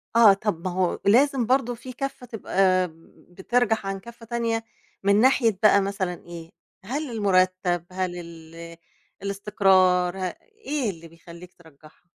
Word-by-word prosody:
آه، 225 -4 +8
طَب 195 -4 -3
ما - - -2
هو 180 0 -1
لازم 255 +4 +4
برضه 245 0 +1
فيه 255 +2 -10
كَفّة 275 -1 -5
تبقى 190 -5 +1 0.4
بترجَح 220 +4 0
عن 195 0 -3
كَفّة 235 +2 -13
تانية 230 -1 -2 0.4
من 200 +2 +4
ناحية 235 -5 +3
بقى 205 -1 +6
مثلًا 195 -2 -2
إيه، 170 -1 -10 0.3
هل 275 +5 -4
المرتب؟ 185 -4 +1
هل 185 -1 -3
ال 165 0 -11 0.5
الاستقرار؟ 190 -3 +2
ه - - -6 0.4
إيه 280 -6 -1
اللي 165 -3 -9
بيخلّيك 170 +2 -14
ترجحها؟ 155 -1 -20
195 Hz, 140 wpm, -24 LUFS, 180-230 Hz, 0.5 s, آه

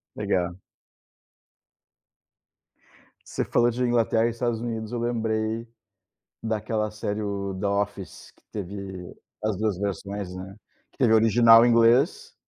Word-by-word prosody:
Legal. 90 +1 -2 2.7
Você - - -2
falou 120 0 +2
de 125 - -3
Inglaterra 115 -2 +2
e 120 - +1
Estados 115 -1 -2
Unidos, 115 -2 -4
eu 120 - -2
lembrei 115 -1 -1 0.8
daquela 110 -1 -2
série, 105 0 -3
o 100 -2 -3
The 105 - -3
Office, 100 -1 -3
que - - -28
teve 95 -2 -7 0.3
as 110 -3 0
duas 105 -4 -1
versões, 100 -1 -4
né? 95 +1 -8 0.4
Que - - -31
teve 120 -4 +4
o - - +7
original 115 +1 +6
inglês 120 - +3
110 Hz, 125 wpm, -25 LUFS, 100-115 Hz, 2.7 s, o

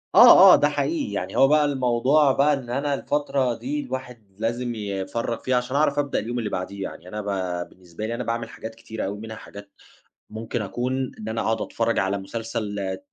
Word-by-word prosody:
آه - - +10
آه، - - +10
ده - - +3
حقيقي. 320 -4 -1
يعني - - -4
هو 135 - +7
بقى 150 +1 +4
الموضوع 135 +1 +3
بقى 140 +3 +3
إن 135 -4 -4
أنا 140 +3 -1
الفترة 140 -3 0
دي 295 +2 -3
الواحد 125 - -6
لازِم 120 +2 -2
يفرّغ 105 +3 -3
فيها، 130 - -1
عشان 125 +2 -2
أعرف 145 0 +2
أبدأ 145 -1 0
اليوم 120 +3 -3
اللي 110 -3 -2
بعديه 95 +1 -4
يعني. 90 - -8
أنا 105 +3 -5
ب 95 -3 -3
بالنسبة 90 +2 -9
لي، 115 +2 -3
أنا 125 - -3
باعمل 115 0 -3
حاجات 110 0 -8
كتيرة 110 0 -6
أوي، 100 +2 -4
منها 110 +1 -8
حاجات 100 -1 -12 0.6
ممكن 110 +2 -4
أكون 125 +5 -2
إن 110 - -6
أنا 110 +1 -2
أقعُد 115 0 0
أتفرَّج 115 0 -1
على 95 +1 0
مسلسل 100 -2 -4
115 Hz, 195 wpm, -24 LUFS, 105-130 Hz, 0.6 s, آه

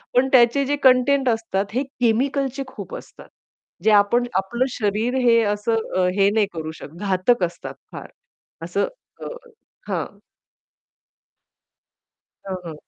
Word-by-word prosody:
पण 260 +2 +4
त्याचे 255 +2 +5
जे 290 +2 0
कंटेंट 260 +1 +4
असतात 225 -3 -1
हे 260 +3 0
केमिकलचे 270 +2 0
खूप - - -8
असतात. - - -14 0.6
जे 220 - +4
आपण 210 +4 +4
आपलं 235 +7 0
शरीर 220 +2 -1
हे 230 -1 +5
असं 215 +2 -1 0.2
अ, 185 -1 +3
हे 200 0 +5
नाही 215 -1 +2
करू 160 -1 -5
शकत. 150 - -10
घातक 195 +2 +1
असतात 170 0 -4 0.2
फार - - -8 0.6
असं - - -1 0.3
अ, - - -5 0.6
हां. - - -3 2.3
हं, 190 -1 -4
हं. 160 - -6
230 Hz, 130 wpm, -22 LUFS, 200-260 Hz, 2.3 s, त्याचे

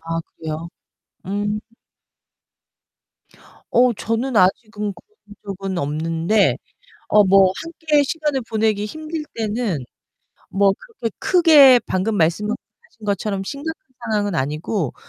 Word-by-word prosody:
아, 165 0 -3 0.2
그래요? 160 +1 -5 0.6
음. 205 +2 -2 2.1
어, 245 +1 +4
저는 230 +4 -2
아직은 210 +2 +1
그런 315 - -19
적은 195 -2 -4
없는데 165 +7 +1 0.5
어 210 -1 +6
뭐 190 0 +6
함께 320 -3 +1
시간을 295 -2 -1
보내기 215 -2 +1
힘들 310 +6 -5
때는 215 - -2 0.6
뭐 195 0 +3
그렇게 435 - -6
크게 305 -8 +7
방금 200 +4 0
말씀하신 200 +6 +1 0.5
것처럼 200 -1 -1
심각한 290 +8 -5 0.4
상황은 205 -3 0
아니고 155 - -2
210 Hz, 225 characters per minute, -21 LUFS, 185-255 Hz, 2.1 s, 크게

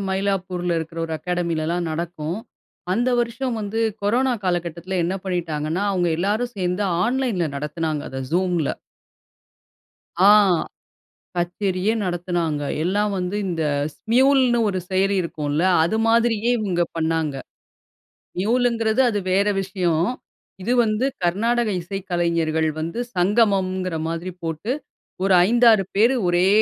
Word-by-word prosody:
மயிலாப்பூர்ல 185 -3 -1
இருக்கிற 165 +1 -6
ஒரு 165 - -5
அகாடமிலலாம் 170 0 -1
நடக்கும். 165 +2 -4 0.5
அந்த 240 +6 +1
வருஷம் 240 +1 -2
வந்து 210 +2 -3 0.2
கொரோனா 250 +6 +2
காலகட்டத்தில 175 +1 -2
என்ன 180 +3 -1
பண்ணிட்டாங்கன்னா, 165 -1 -2
அவுங்க 180 -2 +1
எல்லாரும் 215 +7 -1
சேர்ந்து 180 +1 -1 0.2
ஆன்லைன்ல 240 -8 0
நடத்தினாங்க 150 +1 -2
அத 130 - -5
Zoomல. 175 -4 0 1.5
ஆ - - +8 1.1
கச்சேரியே 185 +3 0
நடத்துனாங்க. 175 -4 -1 0.2
எல்லாம் 205 +3 +1
வந்து 180 +2 -2
இந்த 165 -3 -2 0.3
Smuleன்னு 255 +1 +3
ஒரு 190 -2 -1
செயலி 195 +1 +2
இருக்கும்ல. 150 -2 -2 0.2
அது 210 +7 0
மாதிரியே 230 0 +2
இவுங்க 185 -5 0
பண்ணாங்க. 160 -3 0 1.0
நியூல்ங்கிறது 230 +2 +2
அது 210 -3 -1
வேறு 200 +2 +3
விஷயம். 180 -4 0 0.6
இது 230 +7 0
வந்து 215 +4 0 0.2
கர்நாடக 230 +6 +1
இசைக்கலைஞர்கள் 170 -4 -1
வந்து 165 +8 -3 0.2
சங்கமம்ங்கிற 185 -2 +1
மாதிரி 165 +3 -4
போட்டு, 165 +7 -3 0.5
ஒரு 195 -1 +3
5, 240 +3 +3
6 210 -3 +3
பேர் 230 +6 +4
ஒரே 175 +1 +3
185 Hz, 115 wpm, -22 LUFS, 170-215 Hz, 1.5 s, ஆ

